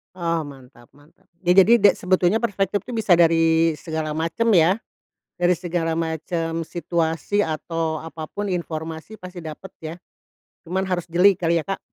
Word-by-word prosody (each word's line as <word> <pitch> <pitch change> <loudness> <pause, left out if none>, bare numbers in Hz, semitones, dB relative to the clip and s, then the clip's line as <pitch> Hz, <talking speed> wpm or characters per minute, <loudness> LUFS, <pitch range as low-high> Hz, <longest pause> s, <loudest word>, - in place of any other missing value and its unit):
Oh 170 -2 -1
mantap 130 -3 -14
mantap, 155 +6 -24 0.2
ya 175 - +3
jadi 195 +5 +7
ada 205 - +7
sebetulnya 185 +3 +2
perspektif 205 -3 0
itu 250 - -7
bisa 215 -3 -1
dari 165 -1 +4
segala 155 -1 -4
macem 165 +8 -1
ya, 180 +6 +4 0.6
dari 175 0 +3
segala 165 -2 -2
macem 165 0 -2
situasi 170 +3 -1
atau 160 -1 -2
apa 160 0 -8
pun 205 0 -4
informasi 165 +2 -5
pasti 180 -1 -9
dapet 160 +4 -9
ya, 160 +1 -6 0.7
cuman 190 +3 -2
harus 180 -2 -1
jeli 185 +2 +5
kali 170 -1 +1
ya - - -9
Kak. 195 - -2
170 Hz, 155 wpm, -22 LUFS, 160-185 Hz, 0.7 s, jadi